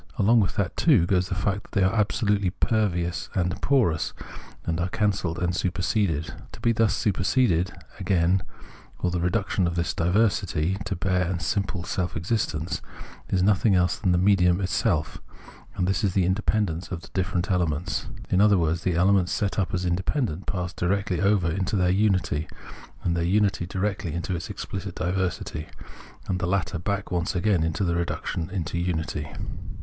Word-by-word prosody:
Along 115 +4 +5
with 100 - 0
that, 100 -1 -1
too, 130 - +4
goes 90 0 +1
the 95 - -1
fact 100 +2 -1
that - - -19
they 100 - +3
are 95 - +2
absolutely 105 -2 +1
pervious 90 -4 0
and 90 +1 -1
porous, 100 - +2 0.5
or 85 - +1
are 90 - 0
cancelled 95 -5 0
and 90 0 0
superseded. 90 -3 0 0.2
To - - -10
be 115 - +2
thus 115 -2 +2
superseded, 95 -3 +1 0.3
again, 90 0 +2 0.6
or 90 - -1
the 90 - -1
reduction 95 0 +1
of 85 - -2
this 85 0 0
diversity 95 -2 +1
to 100 - -2
bare 90 0 0
and 90 -2 -1
simple 100 +1 -1
self 90 -1 -2
existence, 85 -3 -1 0.5
is 90 -2 +2
nothing 100 +1 +4
else 90 0 +3
than 95 - +1
the 90 - +3
medium 90 -1 +4
itself, 95 -4 0 0.6
and 90 -1 0
this 95 - 0
is 95 -3 +1
the 95 -3 +3
independence 95 -2 0
of 90 -2 -5
the - - -13
different 95 +1 -1
elements. 85 -3 -1 0.2
In 95 - +3
otlier 105 -1 +6
words, 80 -1 +1
the 90 -1 0
elements 90 +1 +3
set 100 0 0
up 90 -3 0
as 90 0 -1
independent 95 - -1
pass 90 -2 -2
directly 95 0 0
over 100 -4 +3
into 95 +4 -1
their 90 -2 +3
unity, 95 -6 +1 0.6
and 85 - +1
their 85 - 0
unity 95 -1 +1
directly 95 -2 -2
into 85 +2 -2
its 85 - -5
exphcit 95 -1 -5
diversity, 90 -4 -2 0.6
and 90 -1 -1
the 90 - -1
latter 95 -2 0
back 100 +2 -2
once 85 0 -1
again 90 -1 +2
into 80 +4 0
the 85 -2 +1
reduction 85 -1 -2 0.2
to 85 +1 -3
unity. 80 -4 -2
90 Hz, 175 wpm, -25 LUFS, 85-100 Hz, 0.6 s, otlier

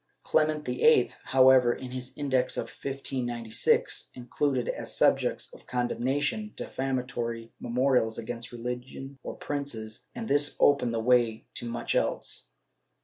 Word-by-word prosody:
Clement 155 -1 +1
VIII, 125 0 +4
however, 130 -2 +6
in 130 -1 -8
his 130 0 -6
Index 130 -3 +1
of - - 0
1596, 120 -4 -1
included, 125 +1 -1
as - - -4
subjects - - +2
of - - -15
con 125 -1 0
demnation, 145 - -1
defamatory 120 -3 -3
memorials 125 -2 +1
against 115 +1 -5
religion 125 +3 -6
or - - -6
princes, 115 -7 -4
and 225 - -5
this 145 -5 +2
opened 125 -5 +4
the - - 0
way 115 -1 +2
to 120 - -4
much 120 0 -2
else. - - -1
125 Hz, 130 wpm, -28 LUFS, 120-135 Hz, -, however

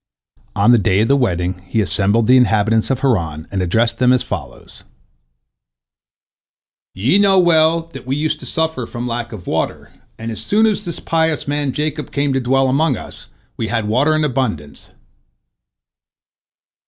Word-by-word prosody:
On 100 +4 +4
the 120 - +5
day 95 0 +2
of 110 - +1
the 140 - +4
wedding 90 -8 -1
he 110 - -1
assembled 100 +4 +1
the 125 - +5
inhabitants 110 -2 +2
of 135 -2 -1
Haran, 85 - -1
and 95 -1 -2
addressed 115 +6 0
them 125 -1 +4
as 125 - +2
follows: - - -8 2.1
"Ye 125 - +2
know 195 -1 +4
well 165 -2 +4
that 130 -2 -10
we 135 - -1
used 155 +2 -1
to - - -10
suffer 160 -7 -2
from 120 0 -6
lack 120 -1 -4
of 105 -6 -9
water, - - -3 0.3
and 115 +1 -5
as 110 -1 -7
soon 215 - +2
as 210 -1 0
this 170 - -6
pious 160 -2 -1
man 145 -1 -1
Jacob 150 +3 -3
came 140 -1 -1
to 135 - +1
dwell 135 +1 +1
among 135 0 +1
us, - - -11 0.3
we 115 - -2
had 115 -2 -2
water 140 +8 +2
in 155 - 0
abundance." 120 - -3
125 Hz, 165 wpm, -18 LUFS, 110-150 Hz, 2.1 s, the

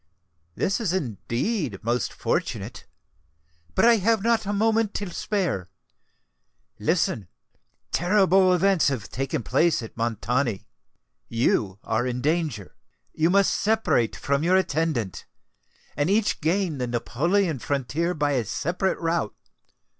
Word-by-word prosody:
"This 195 - 0
is 205 -7 -1
indeed 130 - -2
most 120 +1 0
fortunate! - - -3 0.9
But - - +4
I 235 -1 +6
have 220 +1 +1
not 230 -2 +2
a - - 0
moment 220 +1 +1
to 200 -3 -3
spare. 175 - -2 1.1
Listen! 100 -6 0 0.6
terrible 190 0 +4
events 185 0 +3
have 130 -9 -2
taken 135 -2 -2
place 145 +3 +2
at 110 - -9
Montoni: 115 -1 -1 0.6
you 110 -4 0
are 115 +3 0
in 125 0 -2
danger. 150 - -1 0.4
You 160 +2 +2
must 195 +1 +3
separate 215 - +1
from 140 0 -1
your 175 +3 +3
attendant, 155 - -1 0.7
and 145 +4 0
each 210 -1 +1
gain 165 -2 0
the 125 - -1
Neapolitan 155 +8 0
frontier 145 +7 -1
by 145 -1 +1
a 125 -5 0
separate 175 - -1
route. 165 -8 -1
160 Hz, 125 wpm, -25 LUFS, 120-195 Hz, 1.1 s, I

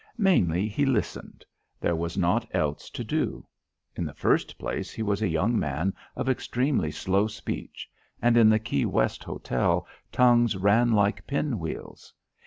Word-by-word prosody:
Mainly 100 - +3
he 110 +7 -1
listened; 130 -6 -2 0.3
there 85 - 0
was 85 +2 -3
nought 90 -2 +1
else 75 -1 -1
to - - -5
do. - - -2 0.5
In - - -2
the - - -5
first - - +1
place - - -4
he 110 - -4
was 100 0 -1
a 110 - +2
young 95 +8 +1
man 75 +7 -1 0.2
of 130 - -3
extremely 130 - 0
slow 95 +7 0
speech 110 0 -6 0.3
and 120 0 +3
in 115 -2 +7
the 110 - +5
Key 110 -10 -1
West - - 0
Hotel 65 - -1 0.3
tongues 120 -4 +4
ran 105 +5 +3
like 105 0 +1
pin 140 -5 -1
wheels. 80 -1 -7
105 Hz, 160 wpm, -26 LUFS, 85-120 Hz, 0.5 s, in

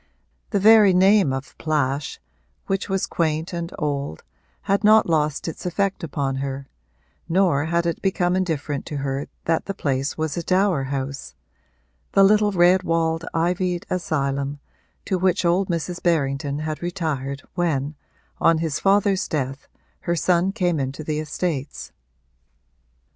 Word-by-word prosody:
The 205 - 0
very 210 -2 +7
name 190 -3 +5
of 135 0 -5
Plash, 145 -2 -1 0.5
which 195 +1 -2
was 195 -1 0
quaint 160 +1 -1
and 170 0 -4
old, 140 - -3 0.4
had 200 +1 +1
not 215 +1 +6
lost 155 -3 0
its 165 - -6
effect 195 +2 -1
upon 140 -3 -2
her, 135 0 -4 0.6
nor 165 -5 +2
had 170 +1 0
it 170 - -2
become 185 -2 +1
indifferent 155 -6 -2
to 150 - -4
her 140 0 -3 0.2
that 165 0 +1
the 195 - -4
place 135 -4 -1
was 160 -2 -2
a 170 - -2
dower 185 -5 +1
house 135 0 -5 0.8
the 195 - +6
little 210 +1 +4
red 180 0 +4
walled, 165 -1 0
ivied 175 +1 0
asylum 140 -5 -1 0.5
to 185 - -1
which 185 -1 +1
old 180 +3 +2
Mrs. 175 +1 -3
Berrington 140 -4 0
had 155 0 -4
retired 150 -6 -3
when, 150 -5 -1 0.5
on 165 -1 +4
his 160 -2 -2
father's 200 0 +2
death, 135 -2 -3 0.4
her 170 - +2
son 175 +2 +2
came 180 -6 0
into 135 +3 -3
the 150 0 -2
estates. 155 -2 -4
165 Hz, 145 wpm, -23 LUFS, 140-185 Hz, 0.8 s, very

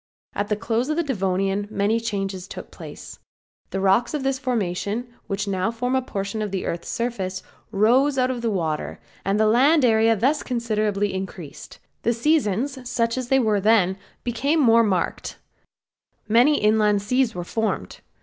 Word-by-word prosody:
At 205 - -2
the 210 - 0
close 230 +5 -1
of 305 - -1
the 340 - +2
Devonian 195 - -1
many 215 +2 +1
changes 195 -4 -3
took - - -9
place. - - -10 0.5
The 195 - -3
rocks 195 +8 +2
of 290 - -3
this 270 -1 0
formation, 220 -3 -2 0.2
which 200 +1 -2
now 190 +1 0
form 245 +2 -2
a 260 - +2
portion 200 -3 -4
of 210 - -2
the 190 -1 -3
earth's 170 0 -4
surface, 195 -6 -3 0.3
rose 250 +7 +3
out 255 0 +2
of 245 -2 -4
the 230 - 0
water, 165 -7 -2 0.2
the 205 +3 +2
land 265 +7 +4
area 225 -1 +4
thus 270 +8 +1
considerably 215 -5 -1
increased, 190 -5 -7 0.2
the 235 - +1
seasons, 255 -1 0
such 230 -2 0
as 255 -2 -3
they 270 - +4
were 215 -5 +2
then, 200 -3 +3 0.3
became 275 +6 0
more 230 -4 +5
marked; 195 -5 -1 0.9
many 245 +7 +4
inland 210 -1 +3
seas 250 +2 +1
were 175 - -3
formed. 220 +5 -3
220 Hz, 165 wpm, -23 LUFS, 195-250 Hz, 0.9 s, more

